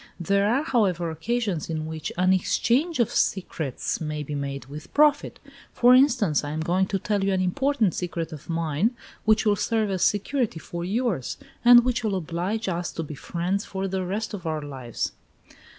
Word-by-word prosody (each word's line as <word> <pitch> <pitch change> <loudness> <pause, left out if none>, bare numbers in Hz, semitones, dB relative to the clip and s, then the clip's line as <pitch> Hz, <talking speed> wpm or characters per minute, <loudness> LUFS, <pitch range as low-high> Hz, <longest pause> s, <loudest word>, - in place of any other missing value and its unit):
There 200 +4 +2
are, 270 +5 +2
however, 185 - +1
occasions 200 0 -2
in 155 -1 -2
which 160 -1 -5
an 185 +1 +4
EXCHANGE 260 - +1
OF 235 - +2
SECRETS 160 -9 -1
may 150 -1 -3
be 150 - -6
made 140 -2 -4
with 150 +3 -10
profit. 295 -1 +3 0.3
For 245 +1 +6
instance, 250 - +4
I 145 - -4
am 155 +2 -3
going 180 +4 +1
to 195 - -1
tell 205 +1 -1
you 195 - +1
an 190 - +1
important 220 - +1
secret 170 -2 -3
of 155 0 -10
mine, 165 - 0 0.3
which 215 0 +3
will 210 -1 +4
serve 215 0 0
as 185 -2 -2
security 215 - +1
for 170 +1 -6
yours, 195 - -1 0.3
and 240 0 +8
which 250 -2 0
will 210 -3 0
oblige 185 +6 -2
us 175 -1 -2
to 165 - -3
be 155 - -7
friends 180 +7 -2
for 195 -2 -4
the 190 0 -2
rest 205 +5 -3
of 180 -5 -5
our 155 -1 -2
lives." 130 -5 -4
185 Hz, 185 wpm, -25 LUFS, 160-225 Hz, 0.3 s, and